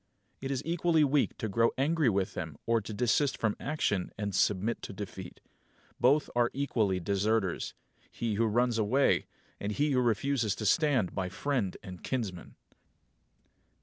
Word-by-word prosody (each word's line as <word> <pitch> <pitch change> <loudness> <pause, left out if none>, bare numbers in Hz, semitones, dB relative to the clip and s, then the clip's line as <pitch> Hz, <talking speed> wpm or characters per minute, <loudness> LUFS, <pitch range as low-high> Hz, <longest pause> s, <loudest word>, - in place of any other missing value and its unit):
It 135 - -5
is 135 0 -2
equally 165 -1 +2
weak 145 0 +1
to 110 - -3
grow 115 +3 +3
angry 150 0 +2
with 95 -2 0
them - - -5
or 115 -1 +2
to 105 - -8
desist 125 +6 +1
from 110 -2 0
action 105 -10 -1
and 105 -1 -3
submit 105 +4 +1
to - - -7
defeat. 95 -2 -8 0.6
Both 140 +4 +4
are 120 0 +3
equally 110 -9 0
deserters 100 +1 0 0.3
he 115 -2 -3
who 115 +2 +2
runs 120 +1 +1
away, 125 +6 +2 0.3
and 100 - -3
he 145 +7 +1
who 130 -2 +3
refuses 115 -2 +1
to 110 - -5
stand 130 - +2
by 95 -2 -2
friend 120 -3 -1
and 90 -2 -9
kinsman. 105 -9 -4
115 Hz, 155 wpm, -30 LUFS, 100-135 Hz, 0.6 s, Both